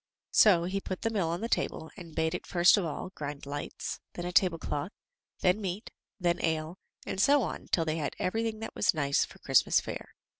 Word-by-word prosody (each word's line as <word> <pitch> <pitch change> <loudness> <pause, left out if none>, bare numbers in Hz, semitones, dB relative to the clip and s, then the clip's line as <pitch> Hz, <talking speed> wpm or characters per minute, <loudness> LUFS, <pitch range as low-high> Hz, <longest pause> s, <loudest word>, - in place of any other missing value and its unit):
So 185 -6 +6
he 190 +3 -2
put 185 -1 -5
the 225 - +1
mill 195 -6 0
on 170 +3 -2
the 230 - -1
table, 160 -7 -1
and 170 -5 -11
bade 160 0 +1
it - - -5
first 175 0 +6
of 200 - 0
all 165 +3 -4
grind 145 -3 -6
lights, 145 +1 -5
then 175 - -5
a 180 - -2
tablecloth, 170 -4 +1 0.5
then 185 +4 +3
meat, 195 +3 -4 0.3
then 175 -1 +1
ale, 160 +2 -1 0.3
and 190 - -1
so 285 +1 +5
on 175 - -5
till 165 - +1
they 155 0 -1
had 150 -3 -3
everything 225 +3 -1
that 225 - -5
was - - +2
nice 140 -2 +2
for - - -15
Christmas - - +4
fare. - - -7
175 Hz, 210 wpm, -30 LUFS, 160-195 Hz, 0.5 s, So